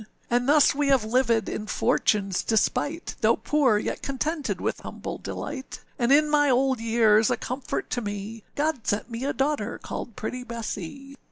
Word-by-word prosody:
âAnd 245 +1 +2
thus 295 0 +6
we 290 0 0
have 270 -4 +4
livèd 230 0 +2
in 215 - -4
Fortuneâs 195 -3 +1
despite, 290 +8 0
Though - - +4
poor, 275 -8 +2
yet 210 - -3
contented 295 +3 -2
with - - -2
humble - - -6
delight, 260 - -6 0.2
And 240 +1 +2
in 300 +2 +6
my 295 -1 +3
old 260 0 +2
years, 225 -1 +4
a - - +1
comfort 255 +1 -4
to 245 - -1
me, 205 +1 -5
God 295 -5 -1
sent 205 +4 -1
me 230 +3 -4
a 280 - +1
daughter 290 +2 -1
called 235 - -6
pretty 250 +3 -4
Bessee. 235 +3 -6
250 Hz, 170 wpm, -26 LUFS, 220-280 Hz, 0.2 s, thus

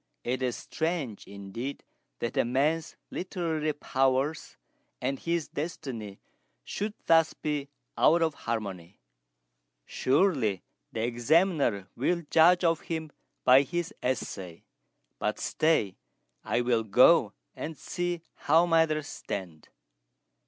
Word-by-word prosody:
It 125 +2 -2
is 125 -2 0
strange, 160 - -3
indeed, 100 +7 -6 0.4
that 120 - -2
a - - +3
man's 150 +7 0 0.2
literary 165 -4 -2
powers 135 +1 0 0.4
and 135 +2 -2
his 170 -2 -1
destiny 125 - -5 0.5
should 210 +1 -4
thus 165 -1 +4
be 145 -2 -3 0.3
out 165 +2 +4
of 160 -2 +1
harmony. 100 -7 -5 0.9
Surely 130 - +1 0.3
the 110 - -2
Examiner 120 - +2
will 170 +7 0
judge 175 +3 +6
of 165 -2 +3
him 160 -2 -4 0.3
by 130 +1 +7
his 175 +7 -3
essay; 95 -8 -3 0.6
but - - -1
stay: 155 - +1 0.5
I 120 - 0
will 120 -2 +2
go 110 -3 +5 0.2
and 155 -1 -6
see 175 -2 -3
how 165 +4 +3
matters 160 -3 +2
stand." 90 - -6
145 Hz, 110 wpm, -28 LUFS, 115-165 Hz, 0.9 s, by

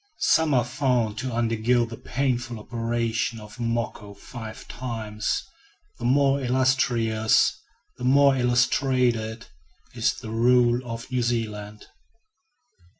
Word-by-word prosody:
Some 160 -3 +3
are 120 -2 +3
found 120 -4 0
to 130 0 -3
undergo 115 +1 +1
the 115 0 -8
painful 125 -2 -2
operation 115 0 -2
of 105 -1 -12
"moko" 115 -3 -3
five 110 0 -9
times. 110 -4 -3 0.6
The 120 - -5
more 140 +2 +3
illustrious, 125 -4 +2 0.4
the - - -7
more 140 +2 +5
illustrated, 125 -2 +1 0.5
is - - 0
the 110 - -8
rule 120 +1 +3
of 115 +2 -7
New 125 -1 0
Zealand. 105 -3 -3
120 Hz, 110 wpm, -25 LUFS, 110-125 Hz, 0.6 s, more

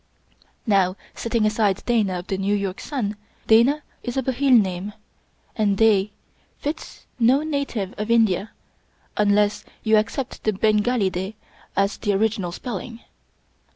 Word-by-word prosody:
Nov/, 195 -4 +3 0.2
setting 230 -2 0
aside 210 -2 +1
Dana 215 -6 +1
of 175 - -6
the 195 -1 -3
New 200 +1 +1
York 200 -2 -3
Sun, 220 -8 -3 0.3
Dana 250 +7 +4 0.2
is 245 +1 -4
a 265 - +1
Bhil 260 -1 +4
name, 190 0 -2 0.6
and 205 -3 +1
Da 210 -2 +4 0.5
fits 300 +2 -6
no 255 +5 +4
native 280 -10 -2
of 210 +1 -3
India 220 -3 +3 0.7
unless 210 0 +2 0.2
you 220 -1 +4
accept 225 +5 -2
the 215 - +1
Bengali 210 0 +2
De 190 +4 -4 0.4
as 200 +1 +1
the 205 -2 0
original 205 -3 0
spelling. 230 +3 -6
215 Hz, 135 wpm, -23 LUFS, 195-235 Hz, 0.7 s, Dana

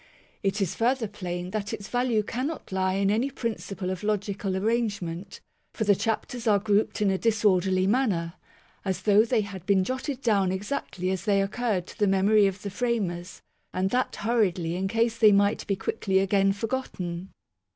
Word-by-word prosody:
It 200 +1 0
is 190 - 0
further 240 0 +1
plain 180 -3 -5
that 210 +1 -3
its 205 -3 -6
value 245 -3 +1
cannot 255 +7 -4
lie 190 0 +1
in 195 0 +2
any 235 +6 +1
principle 200 -7 -4
of 185 - -4
logical 205 -2 -1
arrangement; 200 -4 -2 0.3
for 220 - -1
the 205 -1 +5
chapters 225 +3 -2
are 210 -2 +5
grouped 210 +1 +1
in 200 - +3
a 190 - 0
disorderly 190 -4 +2
manner, 195 -7 +1 0.5
as 190 -1 -2
though 210 0 +5
they 230 -1 +1
had 200 -4 -7
been 195 -2 +4
jotted 260 +4 -3
down 200 -5 +2
exactly 190 -2 -3
as 190 +2 -3
they 200 -2 +3
occurred 195 -2 -1
to - - -13
the 205 - +3
memory 200 +2 +4
of 195 0 -4
the 200 - -4
framers, 200 -6 -2 0.3
and 185 +1 0
that 255 +1 0
hurriedly 185 -7 0
in 190 +1 -1
case 230 +2 0
they 215 -2 +7
might 200 +1 +2
be 200 - +1
quickly 190 -1 -1
again 195 0 +3
forgotten. 195 -5 -4
200 Hz, 175 wpm, -27 LUFS, 190-225 Hz, 0.5 s, they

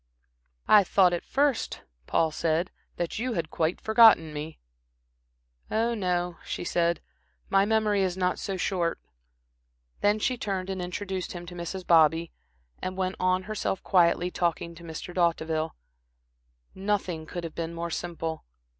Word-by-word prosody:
"I 210 -1 +7
thought 185 -1 +4
at 175 - -2
first," 280 -3 0 0.2
Paul 160 -1 +2
said, 165 +3 0 0.2
"that 175 +4 -3
you 250 +1 -1
had 165 -4 -3
quite 160 +2 0
forgotten 220 -8 +6
me." 150 +2 -6 1.1
"Oh, 230 +2 +1
no," 180 -4 -1
she - - -4
said, 170 0 +1 0.5
"my 195 0 +5
memory 215 -2 +2
is 185 -1 0
not 180 -1 0
so 195 -1 -3
short." 180 -2 -1 1.0
Then 205 +1 +3
she 250 +4 0
turned 195 -2 -2
and 190 -1 -3
introduced 185 +1 -4
him 175 -1 -7
to 175 - -9
Mrs. 175 +2 -5
Bobby, 165 0 +4 0.5
and 185 0 -4
went 185 0 -1
on 185 0 +2
herself 210 -2 -3
quietly 175 -1 +3
talking 170 -1 -1
to 170 - -13
Mr. 165 +2 -7
D'Hauteville. 165 -2 0 1.0
Nothing 190 -5 -2
could 175 - -5
have 165 -2 -6
been 165 0 -4
more 170 0 -4
simple. 165 -2 -4
180 Hz, 145 wpm, -27 LUFS, 170-195 Hz, 1.1 s, I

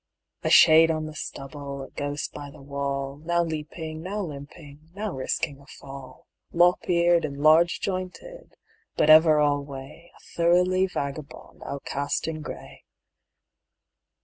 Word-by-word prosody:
A - - -1
shade 160 +1 +7
on 155 -1 -1
the 155 - -7
stubble, 140 -1 -7
a - - -12
ghost 145 0 -4
by 145 -1 -8
the - - -15
wall, 140 0 -3
Now 170 +1 +1
leaping, 155 0 -6
now 200 +5 -4
limping, 150 -1 -10
now 210 0 -3
risking 135 +1 -3
a 140 - -19
fall, 135 -2 -12 0.3
Lop 175 +2 +3
eared 170 -1 +3
and 140 -2 -4
large 160 +4 +4
jointed, 195 - -6 0.4
but 155 - +4
ever 155 -1 +7
alway 145 +2 -2
A - - -21 0.2
thoroughly 180 +2 +3
vagabond 140 -4 -7
outcast 140 +1 -3
in 155 -1 -4
gray. - - -9
155 Hz, 135 wpm, -25 LUFS, 140-170 Hz, 0.4 s, shade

